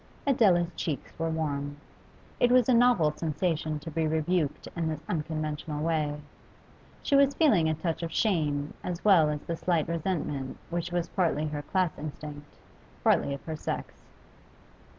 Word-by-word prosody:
Adela's 195 Hz, -11 st, +3 dB
cheeks 145 Hz, -6 st, -4 dB
were 165 Hz, 0 st, 0 dB
warm. 145 Hz, -3 st, -2 dB, 0.6 s
It 245 Hz, -, +4 dB
was 250 Hz, -2 st, +5 dB
a 255 Hz, -, +4 dB
novel 230 Hz, -10 st, +5 dB
sensation 155 Hz, 0 st, -1 dB
to 165 Hz, -, -7 dB
be 160 Hz, +1 st, 0 dB
rebuked 160 Hz, 0 st, 0 dB
in 165 Hz, -2 st, -1 dB
this 155 Hz, -1 st, -4 dB
unconventional 155 Hz, -1 st, -3 dB
way. 155 Hz, -3 st, 0 dB, 0.8 s
She 280 Hz, -, +2 dB
was 275 Hz, 0 st, +5 dB
feeling 210 Hz, -, +4 dB
a 155 Hz, -, +1 dB
touch 160 Hz, +1 st, -2 dB
of 165 Hz, -1 st, -3 dB
shame 150 Hz, -8 st, 0 dB
as 180 Hz, +1 st, -4 dB
well 175 Hz, -7 st, +6 dB
as 150 Hz, -1 st, -2 dB
the 170 Hz, -, -3 dB
slight 165 Hz, -2 st, 0 dB
resentment 160 Hz, -5 st, -2 dB
which 175 Hz, 0 st, -2 dB
was 175 Hz, -1 st, -1 dB
partly 165 Hz, -5 st, +1 dB
her 150 Hz, -1 st, -4 dB
class 180 Hz, +2 st, -1 dB
instinct, 150 Hz, -1 st, -8 dB, 0.5 s
partly -, -, +3 dB
of 140 Hz, -, -12 dB
her 160 Hz, -, -3 dB
sex. -, -, -4 dB
160 Hz, 155 wpm, -28 LUFS, 150-175 Hz, 0.8 s, well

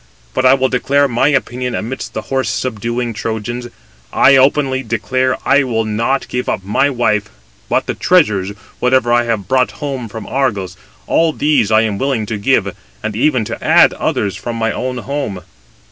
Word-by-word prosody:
But 130 Hz, -, +3 dB
I 130 Hz, -, +6 dB
will 130 Hz, -1 st, +1 dB
declare 140 Hz, +3 st, +2 dB
my 120 Hz, 0 st, +1 dB
opinion 125 Hz, -3 st, -1 dB
amidst 125 Hz, +5 st, -5 dB
the -, -, -3 dB
horse 135 Hz, -1 st, -1 dB
subduing 120 Hz, 0 st, -2 dB
Trojans; 115 Hz, +2 st, -4 dB, 0.4 s
I 135 Hz, -, +5 dB
openly 135 Hz, 0 st, +3 dB
declare 130 Hz, +3 st, -1 dB
I 140 Hz, -, +4 dB
will 115 Hz, -4 st, -1 dB
not 115 Hz, +6 st, -1 dB
give 125 Hz, 0 st, -3 dB
up 95 Hz, -, -2 dB
my 105 Hz, +8 st, +2 dB
wife: 110 Hz, -6 st, 0 dB, 0.4 s
but -, -, +1 dB
the -, -, -2 dB
treasures, 105 Hz, -, +2 dB, 0.3 s
whatever 125 Hz, -1 st, +2 dB
I 120 Hz, 0 st, +3 dB
have 110 Hz, -4 st, -2 dB
brought 130 Hz, -1 st, +1 dB
home 135 Hz, -5 st, -5 dB
from 110 Hz, 0 st, -7 dB
Argos, 105 Hz, -9 st, -1 dB, 0.3 s
all 165 Hz, -1 st, +2 dB
these 145 Hz, -10 st, +2 dB
I 110 Hz, 0 st, +4 dB
am 105 Hz, -3 st, -1 dB
willing 135 Hz, -5 st, 0 dB
to 105 Hz, 0 st, -4 dB
give, 100 Hz, -4 st, +1 dB, 0.3 s
and 110 Hz, -1 st, -3 dB
even 130 Hz, -1 st, +1 dB
to -, -, -6 dB
add -, -, +5 dB
others 100 Hz, -2 st, -1 dB
from 120 Hz, -1 st, -5 dB
my 115 Hz, 0 st, 0 dB
own 125 Hz, 0 st, -3 dB
home." 130 Hz, -7 st, -4 dB
125 Hz, 175 wpm, -16 LUFS, 110-135 Hz, 0.4 s, I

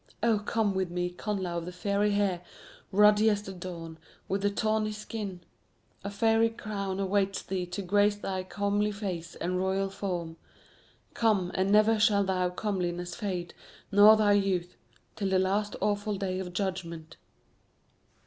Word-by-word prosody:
Oh, 225 Hz, -3 st, +3 dB
come 210 Hz, 0 st, 0 dB
with 190 Hz, -2 st, -1 dB
me, 180 Hz, 0 st, -2 dB
Connla 185 Hz, -3 st, -3 dB
of 170 Hz, -, -8 dB
the -, -, -4 dB
Fiery 200 Hz, +3 st, 0 dB
Hair, 195 Hz, -4 st, +1 dB, 0.5 s
ruddy 210 Hz, +2 st, +5 dB
as 205 Hz, -1 st, 0 dB
the 195 Hz, -, -7 dB
dawn, 170 Hz, -3 st, -8 dB, 0.3 s
with 195 Hz, +1 st, -1 dB
thy 205 Hz, -, +2 dB
tawny 215 Hz, +1 st, 0 dB
skin. 210 Hz, -3 st, -6 dB, 0.6 s
A 200 Hz, -, -3 dB
fairy 225 Hz, +2 st, +3 dB
crown 200 Hz, -4 st, -4 dB
awaits 195 Hz, 0 st, 0 dB
thee 185 Hz, -2 st, -3 dB
to 180 Hz, +3 st, -5 dB
grace 205 Hz, +2 st, +3 dB
thy 190 Hz, -2 st, -3 dB
comely 205 Hz, +2 st, 0 dB
face 185 Hz, -5 st, -5 dB
and 180 Hz, +1 st, -2 dB
royal 190 Hz, +1 st, 0 dB
form. 175 Hz, -5 st, -4 dB, 0.8 s
Come, 205 Hz, -6 st, +1 dB
and 190 Hz, +1 st, +1 dB
never 215 Hz, +1 st, +5 dB
shall 210 Hz, -2 st, +4 dB
thy 185 Hz, -2 st, 0 dB
comeliness 180 Hz, -2 st, -3 dB
fade, 180 Hz, -5 st, -4 dB, 0.4 s
nor 210 Hz, +2 st, +8 dB
thy 210 Hz, -1 st, +4 dB
youth, 185 Hz, -3 st, 0 dB, 0.4 s
till 200 Hz, -2 st, -1 dB
the 190 Hz, -, +3 dB
last 200 Hz, +3 st, 0 dB
awful 205 Hz, 0 st, 0 dB
day 190 Hz, -1 st, -2 dB
of 180 Hz, -1 st, -5 dB
judgment." 170 Hz, -4 st, -4 dB
195 Hz, 155 wpm, -29 LUFS, 180-210 Hz, 0.8 s, nor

